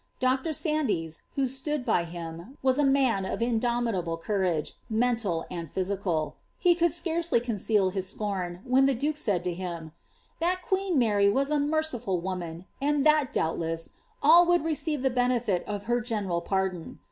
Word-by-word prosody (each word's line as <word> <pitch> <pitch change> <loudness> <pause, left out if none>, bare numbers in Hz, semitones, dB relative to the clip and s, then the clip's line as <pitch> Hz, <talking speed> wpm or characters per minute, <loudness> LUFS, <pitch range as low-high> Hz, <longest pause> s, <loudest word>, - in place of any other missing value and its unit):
Dr. 260 +4 +1
Sandys, 270 - -1
who 275 - +2
stood 270 +1 -3
by 180 -8 +2
him, 170 - -8
was 260 +1 +3
a - - +4
man 270 -7 +3
of 190 - -3
indomitable 230 -7 0
courage, 180 -4 -1 0.2
ineolil 220 -7 +1
and 170 -3 -5
physical; 185 -5 -2 0.2
he 355 - +4
could 340 -1 +2
scarcely 340 -3 +1
conceal 210 -4 +1
his 190 -1 -2
scorn 185 -4 -3
when 260 +1 +4
the 275 - +2
duke 295 +5 -1
said 205 - -1
to 180 -1 -1
him, 170 -3 -6 0.5
''That 365 +2 +1
queen 380 -3 0
Mary 205 -5 +4
was 275 +7 +1
a 300 - +2
merciful 285 - 0
woman, 175 -1 -5 0.2
and 290 0 +1
that, 305 -3 +4
doubtless, 165 0 -2 0.3
all 340 +4 +7
would 350 -2 +3
receive 310 -3 -1
the 265 - +2
l>enefit 245 -6 +1
of 205 -1 -4
her 240 +3 0
general 205 -7 -2
pardon.'' 190 -3 -2
230 Hz, 160 wpm, -28 LUFS, 180-280 Hz, 0.5 s, all